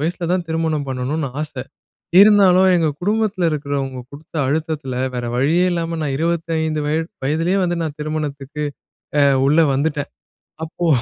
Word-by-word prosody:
வயசுல 170 +3 -2
தான் 180 -1 0
திருமணம் 160 -3 -1
பண்ணணுன்னு 135 +4 -2
ஆசை. 145 -4 -5 0.6
இருந்தாலும் 195 -3 +6
எங்க 165 -2 +2
குடும்பத்துல 205 -2 +1
இருக்கிறவங்க 140 -3 -3
குடுத்த 150 +4 -13
அழுத்தத்தில 150 -2 -2 0.2
வேற 120 -1 -3
வழியே 155 +8 +2
இல்லாம, 165 -1 -2
நான் 140 -3 -1
25 160 -1 -1
வய 155 - +1 0.3
வயதிலயே 165 +7 +1
வந்து 175 -1 0
நான் 155 -3 -4
திருமணத்துக்கு 150 -1 -4 0.6
அ - - +5 0.3
உள்ள 150 +4 +4
வந்துட்டேன். 145 +1 -1 0.5
அப்போ, 170 +2 -3
155 Hz, 135 wpm, -20 LUFS, 145-170 Hz, 0.6 s, இருந்தாலும்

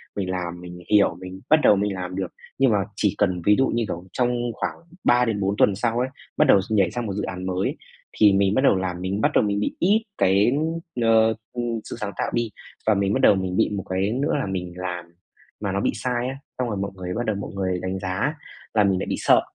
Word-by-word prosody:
Mình 95 -2 -2
làm, 90 -1 -4
mình 90 0 -9
hiểu, 105 -1 +4
mình 95 0 -8
bắt 155 0 +6
đầu - - +7
mình 100 0 0
làm 90 0 -5
được. 95 -2 -2 0.3
Nhưng 135 -3 +4
mà 105 - +3 0.2
chỉ 105 -2 +1
cần 95 -4 +1
ví 105 0 +6
dụ 135 - +3
như 115 0 0
kiểu 85 0 -5
trong 125 -1 +1 0.2
khoảng - - -3 0.3
3 125 0 +4
đến 110 -4 -1
4 100 +1 0
tuần 100 - +4
sau 115 +3 0
ấy, 125 - +1 0.3
bắt 150 - +5
đầu 100 - +7
nhảy 100 -5 +2
sang 120 -1 -3
một 100 - -3
dự 105 - -3
án 90 -1 -5
mới 95 +1 0
ấy - - -5 0.4
thì 105 -2 +7
mình 100 0 +3
bắt 130 - +2
đầu 135 - +5
làm 90 -1 -3
mình 95 +3 -2
bắt 150 - +3
đầu - - +5
mình 100 -1 0 0.2
ít 210 +5 +3
cái, 100 +5 +4 0.5
ờ, 110 -1 +4 0.2
ừm, 120 -2 -2
sự - - -7
sáng 100 -2 -3
tạo - - -1
đi. 120 -1 0 0.4
Và 110 - +6
mình 100 0 +1
bắt - - +1
đầu - - +6
mình 95 -1 -2
bị - - +3
một 100 -3 -3
cái 95 +3 0
nữa 135 +5 0
là - - -1
mình 90 -2 -4
làm 90 -1 -4 0.5
mà 100 -2 -2
nó 100 +1 -1
bị - - +1
sai 125 0 -1
á, 135 - -4 0.2
xong 125 -1 -1
rồi 105 - -2
mọi 100 0 -3
người 90 -1 -5
bắt 120 +4 -2
đầu 110 -2 0
mọi 100 - -5
người 95 -2 -1
đánh 95 +1 -3
giá 95 +11 -1 0.4
là 105 -2 +4
mình 95 -2 +2
lại - - -3
bị - - 0
sợ. - - +5
100 Hz, 260 wpm, -24 LUFS, 95-115 Hz, 0.5 s, đầu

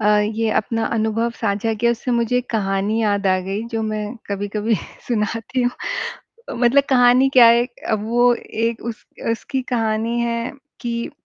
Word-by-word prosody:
अ, 210 - +1
ये 220 +1 0
अपना 225 +1 0
अनुभव 225 +1 0
साझा 215 0 0
किया 235 +2 +2
उससे 235 +2 -3
मुझे 235 +1 +1
एक 250 - -5
कहानी 200 0 0
याद 205 -2 +1
आ 185 0 +3
गई 200 +3 -2
जो 225 - -1
मैं 215 -1 -2 0.2
कभी-कभी 205 +2 -1 0.3
सुनाती 230 +2 -1
हूँ। 245 - +2 0.9
मतलब 250 +4 +5
कहानी 250 +1 +5
क्या 240 -2 +9
है 235 +1 +5 0.3
वो 240 +3 +3
एक 230 0 -3
उस 235 -2 -6 0.3
उसकी 260 +3 -3
कहानी 225 0 0
है 235 +1 -2 0.3
कि 235 -1 -3
225 Hz, 155 wpm, -20 LUFS, 215-235 Hz, 0.9 s, क्या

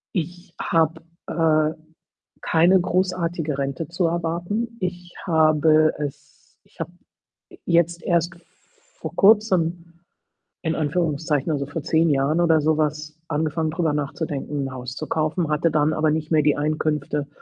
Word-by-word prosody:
Ich 175 +1 -4
habe, 160 0 +1 0.3
äh, 155 -1 +2 0.7
keine 175 +3 +4
großartige 175 -4 -1
Rente 140 +3 -3
zu 170 0 0
erwarten. 175 +8 -2
Ich 180 -1 -5
habe 155 -2 +4
es 145 0 -8
ich - - -28
habe 165 +1 -3 0.8
jetzt 170 0 +2
erst 170 0 +1 0.6
vor - - -7
Kurzem 175 -5 +2 0.6
in 160 -1 -1
Anführungszeichen, 155 -1 0
also 140 -2 0
vor 145 +1 -5
10 160 +1 +2
Jahren 140 +4 +2
oder 165 -2 +4
so 155 +1 +2
was, 150 0 -2
angefangen, 155 +1 -1
drüber 165 -2 0
nachzudenken, 145 -1 -3
'n - - -9
Haus 125 0 -6
zu 155 - -5
kaufen, 155 +1 -1
hatte 150 +2 +1
dann 150 0 +2
aber 155 -1 +2
nicht 155 0 -2
mehr 155 -1 +4
die 150 0 +3
Einkünfte, 150 -1 -1
160 Hz, 140 wpm, -23 LUFS, 150-170 Hz, 0.8 s, keine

